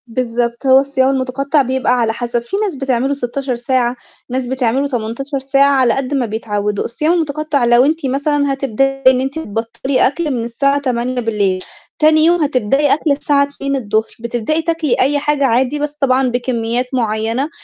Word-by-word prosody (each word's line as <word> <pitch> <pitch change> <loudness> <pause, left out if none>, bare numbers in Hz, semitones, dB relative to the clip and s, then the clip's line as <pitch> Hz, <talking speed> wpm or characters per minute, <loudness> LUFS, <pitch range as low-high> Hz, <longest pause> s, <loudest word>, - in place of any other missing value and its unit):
بالضبط 235 +1 -2
هو 265 0 +6
الصيام 270 -1 +1
المتقطع 275 +2 0
بيبقى 260 -1 0
على 225 -1 +1
حسب 240 0 -2
في 240 +12 -4
ناس 410 -5 -1
بتعمله 265 0 0
16 265 0 -3
ساعة 245 0 0 0.3
ناس 255 0 -2
بتعمله 260 +1 0
18 265 +3 -3
ساعة 275 +1 +3
على 260 -4 +3
قد 270 +1 -3
ما 265 -3 +1
بيتعودوا، 210 -2 -2
الصيام 305 +8 0
المتقطع 305 -4 0
لو 240 +2 +5
أنتِ 315 0 0
مثلًا 285 +1 0
هتبدئي 270 +1 -1
إن 255 -1 0
أنتِ 270 +4 -3
تبطلي 230 +1 -1
أكل 305 +2 -2
من 240 -3 -2
الساعة 275 +5 0
8:00 235 -7 -1 0.4
تاني 310 0 +4
يوم 345 +1 +3
هتبدئي 275 +1 +2
أكل 310 0 0
الساعة 280 0 +2
14:00 275 -1 -3
الضُهر، 220 -3 -1
بتبدئي 235 +7 -2
تاكلي 330 -4 0
أي 285 +3 +2
حاجة 295 -1 +1
عادي 260 +4 +1
بس 295 0 -2
طبعًا 265 -2 +2
بكميات 245 -1 -1
معيّنة 225 +3 -1
260 Hz, 165 wpm, -16 LUFS, 235-280 Hz, 0.4 s, هو